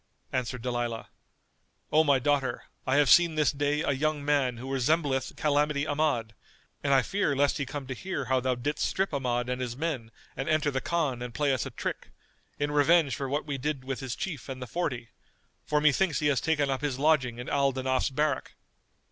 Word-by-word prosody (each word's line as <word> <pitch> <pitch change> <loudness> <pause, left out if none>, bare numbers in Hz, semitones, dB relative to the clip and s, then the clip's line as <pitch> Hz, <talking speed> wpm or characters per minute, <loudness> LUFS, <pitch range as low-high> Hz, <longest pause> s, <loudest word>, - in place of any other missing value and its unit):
Answered 125 -2 -2
Dalilah, 120 -2 -2 0.8
"O 155 +1 +5
my 140 -3 +4
daughter, 135 -2 0 0.2
I 130 - +2
have 145 0 +4
seen 170 +4 +6
this 150 -3 +3
day 145 +1 0
a - - +1
young 145 +1 -1
man 140 -4 +2
who 130 +3 -5
resembleth 135 -1 +1
Calamity 150 -1 +1
Ahmad, 145 -7 0 0.5
and 140 - +1
I 135 -2 +5
fear 195 - 0
lest 140 +1 +2
he 140 - -2
come 140 0 -5
to 130 - -4
hear 145 -1 -4
how 130 0 +2
thou 130 0 0
didst 145 +5 -2
strip 190 -3 0
Ahmad 125 -3 -1
and 125 0 -2
his 125 -1 -4
men 140 -8 -3 0.3
and 135 - -3
enter 155 -2 +2
the 130 -1 -1
Khan 150 -7 -1
and 125 -1 -6
play 145 -2 +2
us 130 - -1
a - - -5
trick, - - -5 0.5
in 145 0 -1
revenge 145 -2 +4
for 135 +1 -4
what 145 +2 -1
we 140 -3 -3
did 140 0 -2
with 135 0 -4
his 130 -3 -4
chief 155 -8 -5
and 130 -1 -5
the 125 - -5
forty; 125 -6 -3 0.6
for 150 - +2
methinks 150 +1 +3
he 150 - -1
has 140 - +1
taken 155 -3 +1
up 135 0 -1
his 145 -4 -1
lodging 135 -5 +2
in 120 +1 -7
Al 140 -1 +2
Danaf's 130 0 0
barrack." 145 0 -1
140 Hz, 205 wpm, -28 LUFS, 130-150 Hz, 0.8 s, seen